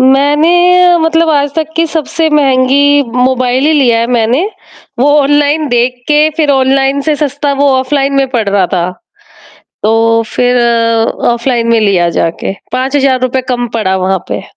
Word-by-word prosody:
मैंने 340 +7 +3
मतलब 325 0 +1
आज 285 -2 0
तक 320 -1 -3
की 330 0 +1
सबसे 320 0 -2
महँगी 285 0 +2
मोबाइल 255 +1 0
ही 315 - +2
लिया 255 -6 +2
है 230 - -1
मैंने, 240 +5 0 0.5
वो 275 +4 +2
ऑनलाइन 290 +2 +1
देख 245 0 0
के, 300 +1 +3
फिर 305 -3 +1
ऑनलाइन 270 +1 +1
से 305 - +2
सस्ता 285 -1 -2
वो 285 - +3
ऑफलाइन 275 +1 -1
में 275 0 +1
पड़ 235 -5 -2
रहा 200 -2 +1
था। 175 0 -1 1.0
तो 225 +1 +2
फिर 245 0 +1 0.7
ऑफलाइन 235 -1 -2
में 230 -1 +2
लिया 190 -5 +1
जाके, 165 +3 -3 0.2
5000 265 0 0
रुपए 255 +1 -1
कम 245 -1 -2
पड़ा 190 -3 -1
वहाँ 190 0 0
पे। - - -3
270 Hz, 155 wpm, -10 LUFS, 245-295 Hz, 1.0 s, मैंने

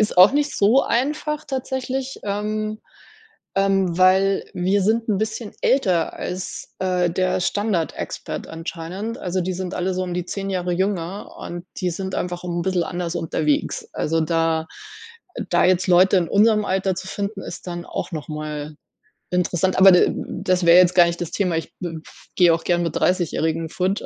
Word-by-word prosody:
ist 210 -3 +1
auch 185 +7 +8
nicht 290 0 0
so 225 +7 +4
einfach 300 +4 -1
tatsächlich, 265 -1 -3
ähm, 215 +1 -3 0.8
ähm, 195 -3 +2
weil 190 +1 +4
wir 190 +2 +1
sind 225 +3 +1
'n 200 -3 +1
bisschen 215 0 -3
älter 185 -11 +2
als, 185 +1 -6
äh, 180 -2 +1
der 185 +1 0
Standard-Expat 200 -3 -2
anscheinend. 175 +8 -6
Also, 185 +1 -2
die 185 +1 -2
sind 185 0 -4
alle 185 +1 -1
so 185 - -1
um 180 -1 -4
die 180 -1 -2
10 195 -1 -4
Jahre 180 -2 -1
jünger 190 0 -2
und 175 +1 -7
die 180 -1 0
sind 190 +2 -4
einfach 175 0 -3
'n 175 -1 -2
bissel 180 -2 0
anders 175 -1 -4
unterwegs. 155 -3 -1
Also, 165 +1 0
da 165 0 +1 0.8
da 175 - +3
jetzt 185 0 +2
Leute 185 +2 +5
in 170 -2 -1
unserem 210 0 +4
Alter 190 0 0
zu 190 0 -6
finden, 200 0 -4
ist - - -8
dann 175 0 -5
auch - - -4
noch 155 -1 -5
mal 150 0 -5 0.6
interessant. 180 0 +1
Aber 190 0 +9
de 180 - +6
m - - -5
das 185 -1 +1
wäre 170 +1 +8
jetzt 180 0 +4
gar 175 -1 +8
nicht 170 0 -2
das 170 - -4
Thema. 180 -5 0
Ich 165 - -5
b 175 - -3 0.2
f - - -17
gehe 175 -2 +5
auch 165 - -2
gerne 175 -1 +2
mit - - -3
Dreißigjährigen 165 -2 0
fort. 185 +4 -1
185 Hz, 180 wpm, -22 LUFS, 175-200 Hz, 0.8 s, Aber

